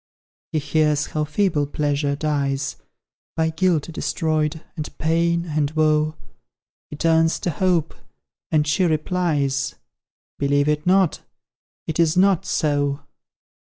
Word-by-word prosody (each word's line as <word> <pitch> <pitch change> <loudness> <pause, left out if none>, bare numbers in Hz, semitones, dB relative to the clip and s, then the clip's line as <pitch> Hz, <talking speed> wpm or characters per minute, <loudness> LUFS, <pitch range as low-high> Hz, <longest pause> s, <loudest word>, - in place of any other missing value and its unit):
He - - -1
hears 150 0 +1
how 155 -1 -2
feeble 155 -2 0
Pleasure 145 -1 -1
dies, 140 -2 -1 0.6
By 160 0 +1
guilt 165 -2 +1
destroyed, 155 -1 -1
and 155 -3 -6
pain 170 +1 +1
and 150 -3 0
woe; 155 0 +1 0.7
He - - -7
turns 165 +1 +2
to 175 - -1
Hope 170 -1 +1 0.6
and 150 -1 +2
she 155 +6 +1
replies, 155 -5 0 0.6
"Believe 145 +1 +2
it 150 +2 0
not 190 -2 +3 0.6
it 160 +1 -4
is 165 +1 +3
not 190 -1 +3
so!" 145 -2 0
155 Hz, 120 wpm, -22 LUFS, 145-165 Hz, 0.7 s, not